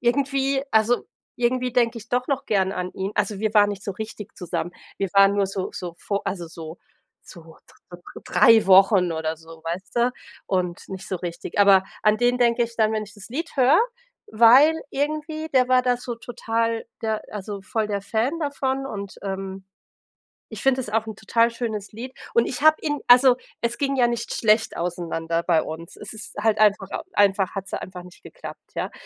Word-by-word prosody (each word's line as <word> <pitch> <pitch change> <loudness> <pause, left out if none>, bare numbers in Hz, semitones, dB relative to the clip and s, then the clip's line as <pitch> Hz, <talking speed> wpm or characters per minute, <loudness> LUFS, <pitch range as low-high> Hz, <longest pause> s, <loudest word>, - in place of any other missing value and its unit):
irgendwie 270 +2 +1
also, 220 +2 +2 0.3
irgendwie 250 +1 0
denke 235 -1 +1
ich 220 0 -13
doch 250 0 0
noch 275 -1 -2
gern 190 -2 +1
an 180 -1 -4
ihn. 190 +2 -3
Also, 210 -3 -1
wir 215 +1 -1
waren 205 -1 +6
nicht 200 -1 -6
so 200 - -3
richtig 215 +1 -8
zusammen, 175 -1 -4 0.3
wir 195 - -1
waren 195 0 +6
nur 200 -1 +2
so 190 -1 -4
so 175 -2 -6
vo 200 - 0
also, 175 -3 -4
so 160 0 -9 0.4
so 170 - -13
dr 160 0 -17 0.5
dr - - -12
3 220 +4 +5
Wochen 190 -2 +5
oder 160 0 -3
so, 160 0 -15
weißt 180 +6 -6
du? 240 +1 +3 0.4
Und 180 -2 -2
nicht 190 -1 -7
so 190 - -3
richtig. 170 0 -6
Aber 195 -2 +6 0.2
an 210 0 +4
den 245 +2 +2
denke 240 -1 +3
ich 235 0 -10
dann, 220 -1 +2
wenn 215 -1 -1
ich 210 - -15
das 205 -3 -11
Lied 320 +8 -5
höre, 265 +4 +5 0.5
weil 245 +8 +6 0.2
irgendwie, 310 +2 -3
der 255 -1 +4
war 255 0 +4
da 250 -1 +2
so 245 -1 -5
total 230 -1 -2 0.2
der 220 -1 -1
also, 205 -1 -6
voll 215 +3 -2
der 205 -1 -2
Fan 225 +10 -1
davon. 270 -2 -2
Und, 200 -6 -6
ähm, 195 -1 -5 0.9
ich - - -7
finde 265 -1 +2
es 210 - -7
auch 225 +1 0
'n 220 - -7
total 230 +3 +2
schönes 220 -4 -5
Lied. 245 +4 -8 0.2
Und 235 - +4
ich 255 - -4
habe 310 +1 +6
ihn 295 -2 -1
also, 250 +1 +7 0.3
es 235 0 -1
ging 275 -1 0
ja 245 -2 +4
nicht 235 -1 -3
schlecht 220 0 +2
auseinander 170 -1 -2
bei 165 -2 +2
uns. 160 +1 -8
Es 210 - -8
ist 220 -1 -9
halt 215 0 +2
einfach 205 -2 +3 0.3
einfach 195 -2 +2
hat's 195 -1 -5
ja - - -3
einfach 185 -1 -8
nicht 180 0 -16
geklappt, - - -11
ja? - - -3
215 Hz, 200 wpm, -23 LUFS, 190-245 Hz, 0.9 s, also